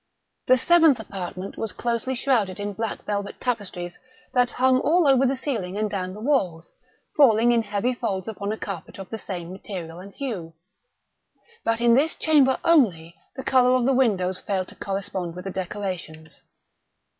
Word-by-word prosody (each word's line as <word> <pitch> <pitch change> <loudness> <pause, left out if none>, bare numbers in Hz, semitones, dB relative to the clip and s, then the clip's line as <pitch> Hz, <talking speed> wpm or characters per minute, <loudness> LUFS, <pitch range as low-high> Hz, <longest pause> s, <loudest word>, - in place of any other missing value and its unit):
The 255 - +6
seventh 320 -1 +5
apartment 190 -2 -6
was 220 -4 -3
closely 240 +2 -2
shrouded 225 -7 +1
in 205 0 -3
black 220 +2 -4
velvet 200 -1 -3
tapestries 185 -7 -3 0.3
that 245 -1 +3
hung 255 +1 +3
all 325 +3 +3
over 270 -1 +5
the 270 - +1
ceiling 220 -9 -3
and 215 -1 -1
down 185 -2 -3
the 210 - -9
walls, 195 - -1 0.4
falling 240 -4 +5
in 235 -1 +3
heavy 210 +3 -1
folds 195 -6 -3
upon 205 -2 -4
a 220 - -3
carpet 190 -7 -7
of 195 -1 -9
the 225 - -4
same 175 -4 -6
material 180 -3 -7
and 195 +2 -12
hue. 200 -12 -5 1.1
But 230 0 0
in 235 -1 +5
this 290 +6 +3
chamber 285 -5 +3
only, 190 - +3 0.2
the 265 - -6
color 255 -1 +4
of 250 -2 +2
the 270 - +3
windows 195 -8 +1
failed 190 -2 -2
to - - -11
correspond 190 -3 -4
with 180 +1 -8
the 195 - -3
decorations. 180 -5 -6
210 Hz, 170 wpm, -24 LUFS, 185-255 Hz, 1.1 s, The